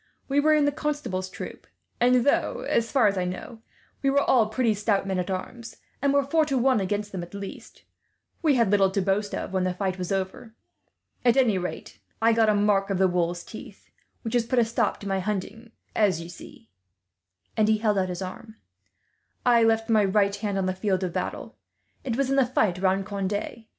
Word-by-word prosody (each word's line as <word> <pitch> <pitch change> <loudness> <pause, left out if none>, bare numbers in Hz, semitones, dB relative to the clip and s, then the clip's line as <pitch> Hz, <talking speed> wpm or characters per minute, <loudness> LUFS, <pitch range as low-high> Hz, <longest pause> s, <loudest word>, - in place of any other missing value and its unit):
We 280 +1 +2
were 310 +1 +4
in 300 -1 +3
the 290 - +2
Constable's 285 -12 -3
troop; - - -9 0.3
and 250 0 +4
though, - - +1
as 230 -1 0
far 265 -5 +4
as 200 -2 +2
I - - 0
know, 220 +5 -6 0.4
we 275 - +2
were 280 +1 +3
all 230 -5 +4
pretty 225 0 +1
stout 205 -1 0
men 190 -1 -1
at 180 - -3
arms, 220 +5 -6 0.2
and 280 0 +2
were 280 0 +3
four 315 +4 +2
to 275 -3 -1
one 255 -1 +3
against 205 +2 -2
them 185 - -4
at 175 +3 -9
least, 200 -1 -9 0.6
we 305 -5 +3
had 230 -5 +2
little 195 -2 +4
to 190 - -1
boast 200 +2 0
of - - -5
when 190 -1 +1
the 185 -1 -1
fight 190 -1 -2
was 180 0 -4
over. 195 +4 -3 0.7
"At 245 +1 +4
any 225 -8 +3
rate, 180 - -6 0.2
I 230 +1 +4
got 225 -1 +3
a 210 - +3
mark 205 -1 +2
of 195 - 0
the 190 0 +4
wolves' 175 -1 -1
teeth, 220 -2 -12 0.3
which 225 - -4
has 240 -2 +1
put 255 - -1
a 235 - +5
stop 230 -1 -1
to 200 - -6
my 195 -1 0
hunting, 210 +4 -4 0.3
as 200 -6 +2
you 170 +1 -8
see," 115 -9 -13 0.8
and 215 -1 +3
he 220 0 +3
held 210 -2 +1
out 185 -1 -1
his 180 +1 -4
arm. 220 +4 -9 0.9
"I 240 -2 +5
left 225 0 +2
my 220 -2 +4
right 200 0 +2
hand 205 -1 -3
on 190 - 0
the 185 - 0
field 190 0 -1
of 180 -2 -3
battle. - - -4 0.5
It 245 -3 -2
was 270 -1 0
in 275 - +2
the 270 - +5
fight 205 -8 +1
round 190 +1 +1
Conde. 205 +1 -3
210 Hz, 215 wpm, -26 LUFS, 190-240 Hz, 0.9 s, a